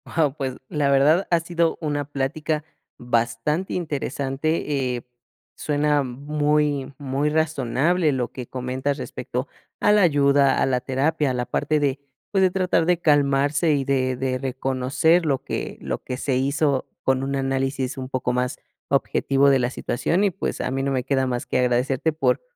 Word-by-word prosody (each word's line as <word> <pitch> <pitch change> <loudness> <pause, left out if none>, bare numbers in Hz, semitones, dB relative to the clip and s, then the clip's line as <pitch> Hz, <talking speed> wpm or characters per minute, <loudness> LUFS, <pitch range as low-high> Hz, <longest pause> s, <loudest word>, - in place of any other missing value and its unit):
Guau, 150 -4 +2
pues, 130 -3 -3
la 145 -2 +1
verdad 145 +7 +4
ha 170 - +4
sido 170 -1 0
una 145 -2 -1
plática 150 +2 -2 0.3
bastante 120 +8 -1
interesante. 140 -3 -1
Eh, 120 - -6 0.5
suena 150 0 +1
muy 145 +1 0
muy 140 +1 -1
razonable 155 +2 +1
lo 125 -2 -2
que 125 - -7
comentas 130 +2 -2
respecto 130 -1 -4 0.3
a 210 - +4
la 210 -1 +5
ayuda, 140 -3 +4
a - - +4
la 130 -1 +1
terapia, 140 +3 0
a - - -2
la 125 -1 -2
parte 150 +4 0
de, 140 -1 0 0.3
pues, 195 -2 +2
de 185 -1 +4
tratar 180 -3 +1
de 175 0 +2
calmarse 145 +1 +3
y 140 -2 +1
de 130 -1 0
de 130 0 -1
reconocer 135 +6 +1
lo 140 -4 0
que - - -4
lo - - -4
que 125 - -4
se 130 -1 0
hizo 140 0 +1 0.2
con 130 0 +2
un 140 +1 -2
análisis 135 0 -1
un 130 -1 -5
poco 130 -2 -1
más 125 0 -1 0.3
objetivo 140 0 +2
de 135 -1 +4
la 120 -1 +1
situación. 170 +10 -1
Y, 200 - +3
pues, 190 - -3
a - - -2
mí 135 +1 -1
no 140 - 0
me 130 -2 0
queda 130 0 +1
más 125 -1 -2
que - - 0
agradecerte 125 +5 +1
por 160 - +1
140 Hz, 175 wpm, -23 LUFS, 130-150 Hz, 0.5 s, la